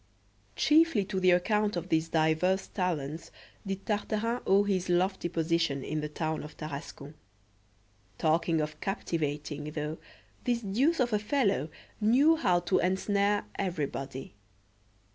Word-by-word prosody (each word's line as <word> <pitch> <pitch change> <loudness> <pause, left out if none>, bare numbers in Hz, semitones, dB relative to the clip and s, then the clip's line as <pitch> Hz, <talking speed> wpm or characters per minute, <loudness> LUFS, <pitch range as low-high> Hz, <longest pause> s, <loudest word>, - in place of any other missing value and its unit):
CHIEFLY 310 -9 +4
to 190 -1 -2
the 185 0 +4
account 210 +3 +2
of 175 - -4
these 160 0 +1
diverse 165 +4 +2
talents 165 -5 -3 0.4
did 195 0 -4
Tartarin 215 +3 -1
owe 195 +1 +5
his 190 -3 -1
lofty 180 0 +1
position 165 -4 0
in 155 0 -2
the 150 - -4
town 155 +1 -2
of 150 - -10
Tarascon. 145 -1 -7 1.0
Talking 165 0 +2
of 150 0 -5
captivating, 150 -6 -3
though, 150 +1 -4 0.4
this 240 -1 0
deuce 260 +12 +1
of 240 -3 +1
a 210 - +3
fellow 210 - +1 0.3
knew 260 +9 +5
how 180 - +2
to 175 +2 +1
ensnare 200 +2 +1
everybody. 140 - -3
180 Hz, 130 wpm, -29 LUFS, 155-205 Hz, 1.0 s, owe